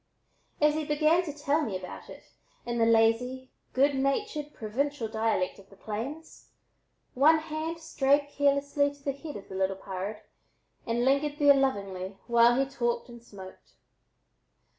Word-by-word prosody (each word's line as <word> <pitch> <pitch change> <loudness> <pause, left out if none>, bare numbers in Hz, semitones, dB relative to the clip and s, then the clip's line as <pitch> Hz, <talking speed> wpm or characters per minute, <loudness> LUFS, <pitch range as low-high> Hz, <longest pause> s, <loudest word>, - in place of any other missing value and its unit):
As 300 0 +4
he 310 0 -2
began 305 +3 +3
to 305 - -4
tell 290 +1 0
me 215 -10 -2
about 185 -1 -10
it - - -11 0.4
in 240 0 -2
the 225 - +4
lazy, 230 +3 +2 0.2
good 280 +2 +3
natured, 295 +3 -1
provincial 255 +3 -2
dialect 220 -4 -1
of 195 - -17
the 195 - -16
plains, 240 +11 -7 0.6
one 300 +5 +5
hand 315 +1 -4
strayed 285 -2 +1
caressingly 285 0 +2
to 285 - -23
the 275 - 0
head 285 +2 -8
of 195 - -12
the - - -10
"little 190 0 0
pard" 195 +2 -6 0.7
and 235 +1 0
lingered 285 +2 +1
there 290 -2 +7
lovingly 195 -8 -1
while 235 0 +5
he 270 - +3
talked 240 -2 -2
and 235 -1 -11
smoked. 190 -5 -13
270 Hz, 155 wpm, -28 LUFS, 220-290 Hz, 0.7 s, there